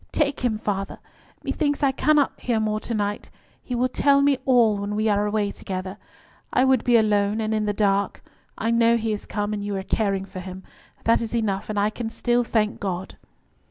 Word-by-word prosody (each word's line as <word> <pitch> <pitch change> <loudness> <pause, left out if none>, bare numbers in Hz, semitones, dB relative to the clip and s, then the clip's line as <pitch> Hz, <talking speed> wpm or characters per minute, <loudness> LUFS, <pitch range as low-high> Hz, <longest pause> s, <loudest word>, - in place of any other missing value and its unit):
"Take 285 -2 0
him, 240 -4 0
father; 200 -2 -3 0.5
methinks 290 -2 -1
I 275 - +4
cannot 295 +1 +3
hear 235 -3 0
more 215 0 0
to 230 - -4
night. 205 -1 -2 0.3
He 250 - -4
will 250 +1 +2
tell 280 +2 +3
me 280 -2 +3
all 235 -5 +4
when 205 +1 -3
we 215 +1 +1
are 205 0 +2
away 205 -1 0
together. 190 +1 -6 0.5
I 255 - +3
would 260 -3 +3
be 240 -1 +5
alone, 210 -1 +2
and 220 0 -1
in 215 -1 0
the 210 - +1
dark; 200 -1 0 0.3
I 225 +2 0
know 230 0 +4
he 225 -1 -1
is 210 - -6
come, 205 0 -2
and 205 -1 -3
you 205 0 -3
are 190 - -3
caring 195 -1 0
for 190 -1 -8
him. 185 +1 -8 0.4
That 230 +1 +3
is 230 0 -3
enough, 210 -3 -1
and 210 -1 -1
I 205 +1 +2
can 225 0 -4
still 240 +1 +1
thank 215 -2 0
God." 190 -1 -4
215 Hz, 210 wpm, -24 LUFS, 205-240 Hz, 0.5 s, be